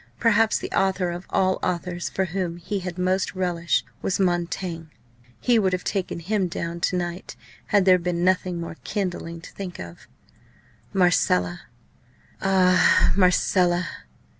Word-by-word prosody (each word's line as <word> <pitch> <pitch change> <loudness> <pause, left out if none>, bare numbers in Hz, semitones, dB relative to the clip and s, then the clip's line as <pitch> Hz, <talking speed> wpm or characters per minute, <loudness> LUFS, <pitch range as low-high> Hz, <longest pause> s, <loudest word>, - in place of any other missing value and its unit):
Perhaps 225 -1 +3
the - - -6
author 190 -2 +1
of 175 +2 -7
all 185 -1 +1
authors 175 0 -2
for 190 - -1
whom 175 -1 -3
he 195 +4 -3
had 180 -1 -6
most 185 +2 0
relish 175 -2 0 0.2
was 190 - -1
Montaigne. 175 -2 -1 0.5
He 240 -2 +3
would 190 -3 +1
have 185 - -1
taken 190 -4 -2
him 195 +2 0
down 170 0 -4
to 180 - 0
night 175 +1 -4 0.3
had 205 -3 +3
there 185 -1 +6
been 175 0 -2
nothing 185 -1 +1
more 170 -1 -6
kindling 175 -4 -3
to - - -11
think 185 -3 -7
of. 85 0 -10 0.8
Marcella! 180 -1 +2 0.7
ah! 185 -1 +4
Marcella! 180 -2 +3
180 Hz, 140 wpm, -24 LUFS, 175-190 Hz, 0.8 s, there